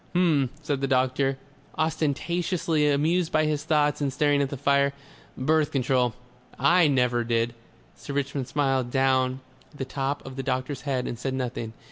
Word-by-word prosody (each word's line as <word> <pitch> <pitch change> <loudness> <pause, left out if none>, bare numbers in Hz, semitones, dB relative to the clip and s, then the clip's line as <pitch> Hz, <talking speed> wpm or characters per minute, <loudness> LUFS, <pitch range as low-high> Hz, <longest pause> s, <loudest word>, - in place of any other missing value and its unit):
"H'm," 155 -7 +3
said 145 -2 -1
the 135 - +1
doctor, 130 +1 +1 0.4
ostentatiously 160 +1 0
amused 160 +4 +1
by 155 -2 +3
his 150 -1 -1
thoughts 150 -2 +1
and 140 -2 0
staring 145 +1 +2
at 140 - 0
the 140 - -5
fire. 140 +1 +2 0.4
"Birth 155 +3 +2
Control! 125 -3 +1 0.4
I 175 -2 +5
NEVER 125 -3 +2
did." 115 0 0 0.4
Sir 140 - -8
Richmond 140 -2 -2
smiled 135 -2 0
down 130 0 +2
on 130 - -9 0.4
the 135 - -4
top 135 +2 -3
of 135 0 -9
the - - -1
doctor's 130 0 -2
head 130 -2 -1
and 120 - -5
said 130 0 -2
nothing. 120 -3 -4
140 Hz, 165 wpm, -26 LUFS, 130-150 Hz, 0.4 s, I